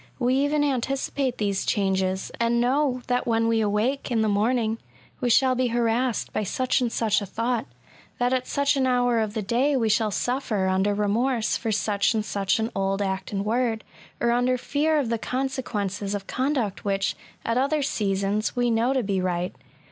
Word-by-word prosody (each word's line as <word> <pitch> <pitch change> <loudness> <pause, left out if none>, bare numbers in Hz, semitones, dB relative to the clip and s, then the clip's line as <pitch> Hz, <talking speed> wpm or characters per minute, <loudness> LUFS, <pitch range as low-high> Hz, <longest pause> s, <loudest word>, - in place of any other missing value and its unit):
We 250 0 +1
even 290 +2 +2
anticipate 270 -1 -1
these 200 -2 0
changes, 190 -2 0
and 235 0 +2
know 255 +1 +1
that 245 0 0
when 225 -1 +2
we 225 -1 +2
awake 220 +8 0
in 235 -3 +1
the - - +1
morning, 220 +2 +1 0.4
we 245 - 0
shall 260 +2 +4
be 255 0 +1
harassed 235 +1 0
by - - 0
such 255 +6 0
and 240 -2 0
such 220 -2 +1
a - - -3
thought;, 230 +3 -1 0.5
that 245 +1 +1
at 255 -1 -1
such 280 0 +1
an 265 -1 +2
hour 245 -2 +2
of 215 -1 -2
the 215 - -1
day 255 +7 +1
we 225 -3 +1
shall 215 0 +2
suffer 220 -3 -1
under 190 +2 +1
remorse 225 +3 +1
for 225 - -2
such 205 +1 +1
and 215 -1 0
such 200 -2 0
an 225 +1 -2
old 195 0 0
act 190 -1 -3
and 200 -1 -2
word, 225 0 0 0.4
or 235 - +2
under 245 +1 +2
fear 300 +5 +1
of 275 -6 0
the 230 -1 -1
con 265 +4 -1
sequences 205 -6 -3
of 195 -1 -5
conduct 255 -6 -1
which, 195 -1 0 0.3
at 230 +2 +1
other 285 +2 +1
seasons, 200 -2 -1
we 245 -1 +1
know 230 +3 +2
to 260 -2 +1
be 195 -2 0
right. 180 -1 -1
230 Hz, 195 wpm, -25 LUFS, 205-255 Hz, 0.5 s, shall